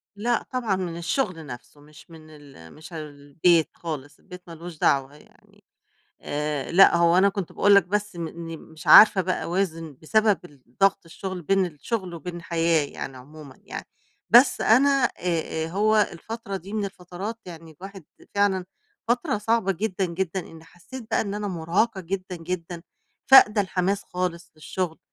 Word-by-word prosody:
لأ، 235 +3 0
طبعًا 235 -6 -1
من 175 -3 -4
الشغل 170 - -2
نفسه 130 +3 -11
مش 150 +3 -17
من 155 -1 -14
ال 140 - -15
مش 160 +3 -13
البيت 155 +2 0
خالص، 150 -4 -7
البيت 180 -2 -12
ما 170 - -9
لوش 170 0 -10
دعوة 140 0 +1
يعني. - - -23 0.6
آآ، 150 -1 -3
لأ 180 -1 +7
هو 170 +1 +4
أنا 200 +1 +5
كنت 195 -3 -5
باقول 205 0 +4
لك 200 -4 +6
بس 205 0 -2
م 165 -1 -4
إني 165 -1 -8
مش 160 0 -14
عارفة 210 -2 +9
بقى 185 0 -2
أوازن 165 -5 -3
بسبب 215 +3 +2
الضغط 145 +5 -1
الشغل، 180 +2 -7
بين 195 +3 +2
الشغل 180 +3 -5
وبين 170 +2 -7
الحياة 165 -2 0
يعني 135 -1 -8
عمومًا 140 +1 -13
يعني، - - -7 0.4
بس 245 +4 +6
أنا 260 +6 +5 0.2
آآ، 165 -6 -2
آآ، 160 - -5
هو 215 +5 +2 0.2
الفترة 200 +2 -6
دي 190 +2 -10
من 215 -2 -1
الفترات 195 +3 -7
يعني 165 -2 -10
الواحد 190 +2 -11 0.3
فعلًا 195 -2 +1 0.4
فترة 240 -3 0
صعبة 215 -2 +1
جدًا، 195 +1 -2
جدًا، 185 +1 -3
إني 165 -1 -13
حسيت 200 +9 -11
بقى - - +2
إن 200 -1 -3
أنا 210 0 -3
مرهقة 190 +5 -1
جدًا، 185 0 -5
جدًا 170 0 -6 0.4
فاقدة 215 -5 +7
الحماس 190 +1 -1
خالص 180 -2 -4
للشغل 160 +2 -4
180 Hz, 160 wpm, -24 LUFS, 160-200 Hz, 0.6 s, عارفة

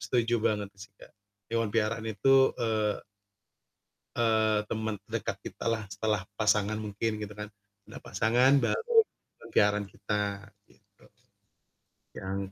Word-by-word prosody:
Setuju 115 +3 +1
banget 105 -2 +1
sih, 100 0 -10
Kak. - - -14 0.4
Hewan 115 -1 +1
peliharaan 115 0 0
itu, 135 +6 +4
eee 110 -2 0 1.2
eee, 110 -2 +3
teman 110 -1 -2 0.2
dekat - - -1
kitalah 115 -1 -2
setelah 105 -1 0 0.2
pasangan 105 0 +2
mungkin 105 +2 -1
gitu 105 0 -6
kan. 105 0 -5 0.4
Ada - - -9
pasangan 120 +6 +3
baru, 470 +1 -1 0.3
hewan - - -17
peliharaan 105 0 +3
kita 105 -1 -2 0.5
gitu. - - -26 1.1
Yang 95 0 -4
110 Hz, 120 wpm, -29 LUFS, 105-115 Hz, 1.2 s, itu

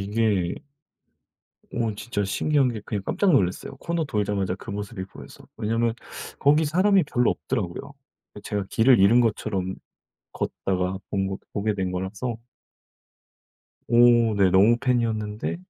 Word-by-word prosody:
이게 100 -3 0 1.2
어 115 -3 -1
진짜 105 -2 -3
신기한 140 +7 +1
게 110 - -6
그냥 105 -4 -3
깜짝 200 -3 +1
놀랐어요. 95 - 0
코너 170 -1 -2
돌자마자 105 -7 -1
그 105 +3 -9
모습이 100 -2 -5
보여서. - - -13
왜냐면 115 +1 0 0.4
거기 150 +3 +4
사람이 185 +4 +3
별로 125 -4 +1
없더라고요. 110 +8 -4 0.4
그 105 - -9
제가 100 -1 -3
길을 120 +2 +4
잃은 110 +6 +6
것처럼 100 -5 -1 0.6
걷다가 95 0 -2
본 95 -1 -1
거 95 +1 -4 0.2
보게 105 +1 0
된 95 -2 -2
거라서. 100 +6 -4 1.5
오 120 -2 +5
네 100 -2 +4
너무 100 +6 +5
팬이었는데 115 -2 -1
110 Hz, 285 characters per minute, -24 LUFS, 100-120 Hz, 1.5 s, 잃은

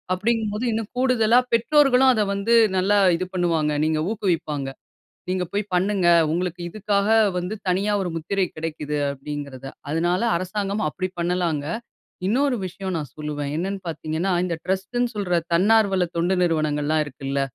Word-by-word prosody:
அப்படிங்கும்போது, 220 +2 -1
இன்னும் 220 -1 -3
கூடுதலா 245 -2 +4
பெற்றோர்களும் 265 +1 +5
அதை 215 -3 +1
வந்து 200 +4 +2 0.2
நல்லா 200 +2 +3 0.2
இது 185 - -3
பண்ணுவாங்க. 165 -4 +1
நீங்க 155 -1 +1
ஊக்குவிப்பாங்க. 160 -9 -1 0.6
நீங்க 185 0 0
போய் 205 0 0
பண்ணுங்க. 190 0 +1 0.2
உங்களுக்கு 175 +1 -2
இதுக்காக 200 +1 0 0.3
வந்து 180 +4 -4 0.2
தனியா 200 +3 +1
ஒரு 175 - -3
முத்திரை 190 +4 -1
கிடைக்குது 155 -2 -3
அப்படிங்கிறதை. 140 -1 -7 0.2
அதனால 175 +4 +1 0.2
அரசாங்கமும் 195 -1 -2
அப்படி 185 +4 -3
பண்ணலாங்க. 170 -4 0 0.6
இன்னொரு 255 +5 +2
விஷயம் 190 +1 -5
நான் 150 -5 -5
சொல்லுவேன். 150 -2 -4
என்னன்னு 195 +3 -3
பார்த்தீங்கன்னா, 160 +3 -2
இந்த 175 -2 -1
ட்ரஸ்ட்டு 190 +6 -2
ன்னு 245 -1 +1
சொல்ற 195 -4 -1 0.2
தன்னார்வல 195 0 +3
தொண்டு 175 +3 +1
நிறுவனங்கள்லாம் 155 -2 +1
இருக்குல்ல. 140 -1 -4
185 Hz, 135 wpm, -23 LUFS, 155-210 Hz, 0.6 s, பெற்றோர்களும்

